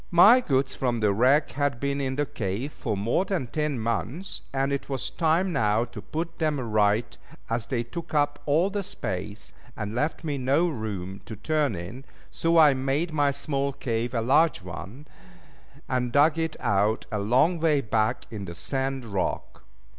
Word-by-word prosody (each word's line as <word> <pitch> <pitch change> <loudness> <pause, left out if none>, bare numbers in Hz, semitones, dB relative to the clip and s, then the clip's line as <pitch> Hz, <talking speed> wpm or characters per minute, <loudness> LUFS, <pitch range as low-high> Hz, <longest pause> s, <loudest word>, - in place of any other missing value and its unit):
My 200 +8 +8
goods 135 - +1
from 120 -3 -1
the 105 -2 +2
wreck 130 +8 +3
had 145 -3 -1
been 140 +1 -1
in 130 -1 -1
the 145 +1 0
cave 115 +4 -4
for 110 -6 -3
more 115 - +1
than 190 -8 -2
ten 150 +2 -2
months; 115 - -3
and 135 +1 0
it 140 - -3
was 135 -1 -3
time 165 +5 +1
now 110 -4 +2
to 120 - -9
put 165 +2 -5
them 155 -3 +1
right, 110 -1 +1 0.4
as 115 0 -1
they 120 -2 -1
took 170 +8 -7
up 145 -1 +2
all 165 +7 +3
the 205 0 -1
space, 105 - -6 0.2
and 105 -1 -4
left 150 +7 -1
me 145 -3 -2
no 140 +7 +2
room 100 - -5
to 110 - -6
turn 145 +2 0
in: 95 +10 -7 0.3
so 165 0 +1
I 150 -3 +7
made 135 +5 -1
my 145 -2 +3
small 140 0 -2
cave 120 -2 -2
a 115 - +1
large 140 - +3
one, 95 - -8 0.8
and 125 -2 -1
dug 150 +4 +4
it 160 -1 -1
out 105 -2 +1
a 105 - -1
long 130 - +3
way 155 -3 +3
back 110 0 0
in 105 -3 -5
the 85 -2 -7
sand 135 +7 -2
rock. 100 -4 -3
135 Hz, 180 wpm, -26 LUFS, 110-150 Hz, 0.8 s, My